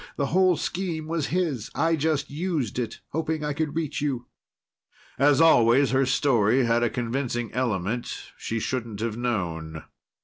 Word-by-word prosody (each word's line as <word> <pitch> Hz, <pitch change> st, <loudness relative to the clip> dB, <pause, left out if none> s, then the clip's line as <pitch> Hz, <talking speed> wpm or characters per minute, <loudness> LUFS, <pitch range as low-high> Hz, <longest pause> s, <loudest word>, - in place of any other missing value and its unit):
The 140 Hz, -, 0 dB
whole 185 Hz, -2 st, +4 dB
scheme 170 Hz, -1 st, -3 dB
was 160 Hz, -2 st, -1 dB
his. 155 Hz, -, -1 dB
I 165 Hz, 0 st, +2 dB
just 155 Hz, -2 st, -1 dB
used 150 Hz, -, -2 dB
it, 120 Hz, -, -4 dB
hoping 160 Hz, 0 st, -2 dB
I 150 Hz, -, -1 dB
could 155 Hz, 0 st, -2 dB
reach 160 Hz, -4 st, -2 dB
you." 130 Hz, -5 st, -2 dB, 0.9 s
As 145 Hz, +1 st, +5 dB
always 130 Hz, -4 st, +5 dB
her 135 Hz, 0 st, +2 dB
story 130 Hz, -3 st, +3 dB
had 115 Hz, 0 st, +2 dB
a 120 Hz, -, +2 dB
convincing 120 Hz, -1 st, -2 dB
element 115 Hz, -2 st, -2 dB
she 115 Hz, -, -3 dB
shouldn't 115 Hz, -3 st, -3 dB
have 115 Hz, -1 st, -2 dB
known. 85 Hz, -10 st, -3 dB
135 Hz, 150 wpm, -25 LUFS, 115-155 Hz, 0.9 s, As